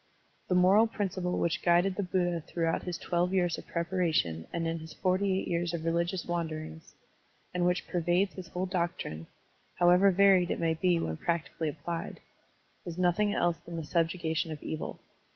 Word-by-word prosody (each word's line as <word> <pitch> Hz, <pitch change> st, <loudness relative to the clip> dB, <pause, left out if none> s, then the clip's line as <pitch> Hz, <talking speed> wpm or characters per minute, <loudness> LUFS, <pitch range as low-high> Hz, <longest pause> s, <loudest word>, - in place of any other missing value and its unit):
The 180 Hz, -, +2 dB
moral 190 Hz, +5 st, +6 dB
principle 185 Hz, -4 st, -2 dB
which 170 Hz, 0 st, 0 dB
guided 175 Hz, +2 st, +3 dB
the 205 Hz, -, -1 dB
Buddha 175 Hz, -2 st, 0 dB
throughout 165 Hz, +1 st, -1 dB
his 175 Hz, -1 st, -4 dB
twelve 180 Hz, +2 st, 0 dB
years 175 Hz, -3 st, +1 dB
of -, -, -13 dB
preparation 170 Hz, -, 0 dB
and 170 Hz, -1 st, -2 dB
in 165 Hz, 0 st, -2 dB
his 160 Hz, -1 st, -10 dB
forty 190 Hz, +2 st, +1 dB
eight -, -, -5 dB
years 170 Hz, 0 st, -1 dB
of 165 Hz, -1 st, -5 dB
religious 170 Hz, +2 st, 0 dB
wanderings, 160 Hz, -2 st, -5 dB, 0.6 s
and 180 Hz, 0 st, +1 dB
which 180 Hz, +1 st, 0 dB
pervades 180 Hz, +2 st, +1 dB
his 185 Hz, -2 st, -8 dB
whole 180 Hz, +2 st, -3 dB
doctrine, 170 Hz, -, -3 dB, 0.5 s
however 180 Hz, +3 st, +5 dB
varied 190 Hz, -2 st, +5 dB
it -, -, -1 dB
may 165 Hz, -1 st, +2 dB
be 175 Hz, +1 st, +2 dB
when 80 Hz, -, -3 dB
practically 165 Hz, -1 st, -2 dB
applied, 165 Hz, +3 st, -5 dB, 0.6 s
is 175 Hz, -2 st, -7 dB
nothing 185 Hz, +3 st, +2 dB
else 175 Hz, -1 st, +1 dB
than 170 Hz, -, -9 dB
the 165 Hz, -, -3 dB
subjugation 165 Hz, 0 st, 0 dB
of 150 Hz, -, -7 dB
evil. 155 Hz, -, -5 dB
175 Hz, 170 wpm, -30 LUFS, 165-185 Hz, 0.6 s, moral